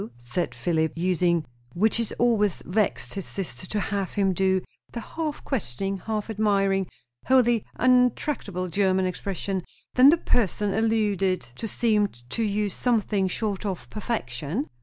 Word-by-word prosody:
said 120 +9 -3
Philip, 160 -2 0
using, 175 -2 +2 0.3
which 220 +6 +2
it 230 - -1
always 215 -5 +2
vexed 210 +3 0
his 195 -2 -5
sister 185 -4 -4
to 210 - -2
have 200 -2 -2
him 195 -2 +2
do, 190 0 +2 0.3
the 235 - -4
half 305 +5 -4
questioning, 195 - -2
half 215 +1 -3
admiring, 195 -3 +1 0.4
wholly 240 -4 +4
unattackable 250 -6 +2
German 190 0 +2
expression. 190 +1 -3 0.3
"Then 255 +2 +8
the 330 - +5
person 210 - +1
alluded 210 -4 +1
to 125 - -7
seemed 210 - 0
to - - -1
you 210 -1 +1
something 210 -3 +1
short 200 +1 -2
of 185 - -4
perfection?" 175 - -3
200 Hz, 140 wpm, -26 LUFS, 185-225 Hz, 0.4 s, Then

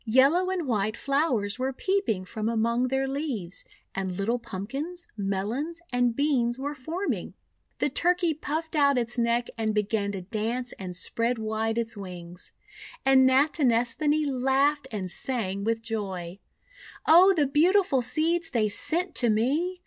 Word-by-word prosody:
Yellow 275 +11 +4
and 360 -5 -2
white 215 -2 0
flowers 260 -7 0
were 260 +1 0
peeping 320 - -1
from 215 +3 -3
among 235 +2 +1
their 265 +1 0
leaves, 265 - -4 0.3
and 190 -2 -3
little 230 +5 0
Pumpkins, 270 - -5
Melons, 215 - -2
and 245 -1 +2
Beans 255 -4 +1
were 285 +2 -3
forming. 325 +8 -4 0.4
The - - +1
Turkey 350 +3 +2
puffed 315 +2 -4
out 280 -2 +4
its 240 0 -1
neck 235 +1 +1
and 220 -1 0
began 210 -1 0
to 190 -2 -5
dance 230 +5 -3
and 185 -2 -5
spread 230 +6 0
wide 220 +1 -2
its 230 -1 0
wings. 180 -3 -9 0.5
And 265 -1 +6
Nati 285 +4 +3
nesthani 265 +6 +2
laughed 270 +2 +1
and 190 -4 -4
sang 200 -6 -2
with 225 +1 -1
joy: 195 -5 -4 0.3
— - - -23 0.3
"Oh, 370 +4 +7
the 300 -4 +3
beautiful 310 0 +3
Seeds 325 +7 0
they 220 -5 +1
sent 345 - -1
to 240 - +3
me! 285 +12 +1
245 Hz, 150 wpm, -27 LUFS, 215-295 Hz, 0.5 s, Oh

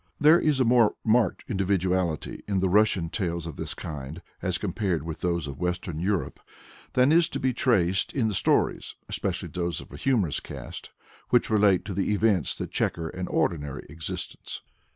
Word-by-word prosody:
There 155 +3 +7
is 150 -3 +2
a 130 - +4
more 115 -2 +4
marked 110 -3 +2
individuality 95 -5 0
in 100 -2 0
the 95 0 +2
Russian 100 -4 +3
tales 85 -5 -2
of 80 -4 -6
this - - -4
kind, 75 +2 -7 0.2
as - - 0
compared 90 -8 -1
with 80 -1 -6
those 85 -3 0
of 70 -2 -7
Western 90 -2 -2
Europe, 95 +1 -1 0.5
than 130 +3 +4
is 165 0 +5
to - - -3
be 130 -1 +1
traced 95 -8 +2
in 125 -5 +1
the 105 - -1
stories - - +1
(especially - - -2
those 85 -1 -2
of - - -12
a - - -7
humorous 110 - +1
cast) - - -8 0.4
which 120 -2 +3
relate 100 -3 +4
to 100 - -4
the 100 +2 0
events 100 - +2
that - - -5
chequer 80 -1 -1
an 90 +1 -5
ordinary 75 -5 -1
existence. 80 -2 -6
95 Hz, 175 wpm, -27 LUFS, 85-110 Hz, 0.5 s, There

